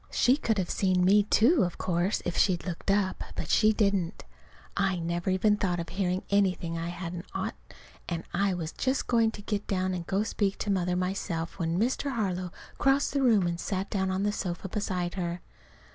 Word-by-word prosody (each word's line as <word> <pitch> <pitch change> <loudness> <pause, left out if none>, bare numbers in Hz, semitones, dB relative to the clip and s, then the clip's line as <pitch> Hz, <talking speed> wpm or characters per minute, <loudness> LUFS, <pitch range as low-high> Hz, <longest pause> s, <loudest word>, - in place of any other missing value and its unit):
She 250 - +4
could 225 -7 0
have 185 -3 -1
seen 185 -2 +2
me, 205 +3 +6
too, 235 - +4
of 175 -1 -2
course, 180 +2 0
if 175 - -2
she'd 180 -3 +2
looked 180 +1 -4
up. 195 -1 +1
But 155 - -3
she 215 0 +5
didn't. 200 -4 0 0.5
I 195 -2 +1
never 170 +1 -2
even 205 +3 +3
thought 180 -4 0
of 170 - -5
hearing 185 -1 -1
anything 185 -4 +1
I 165 0 -3
hadn't 175 0 -6
ought, - - -2 0.6
and 170 -2 -3
I 195 +1 +1
was 165 -2 -4
just 260 +1 -1
going 230 -2 +3
to 210 -2 -9
get 205 -1 -3
down 185 -1 0
to 180 - -2
go 185 +3 -2
and 210 +2 +1
speak 200 -3 0
to 205 - -2
Mother 180 -2 +1
myself, 180 -2 -2
when 165 0 0
Mr. 260 +4 0
Harlow 185 -6 -2 0.3
crossed 275 +1 +3
the 280 - +1
room 220 -8 +4
and 170 0 -2
sat 190 +1 -3
down 190 -2 0
on 190 +1 0
the 205 - +2
sofa 185 -2 -4
beside 180 -3 -2
her. 175 -2 -3
190 Hz, 205 wpm, -28 LUFS, 175-205 Hz, 0.6 s, me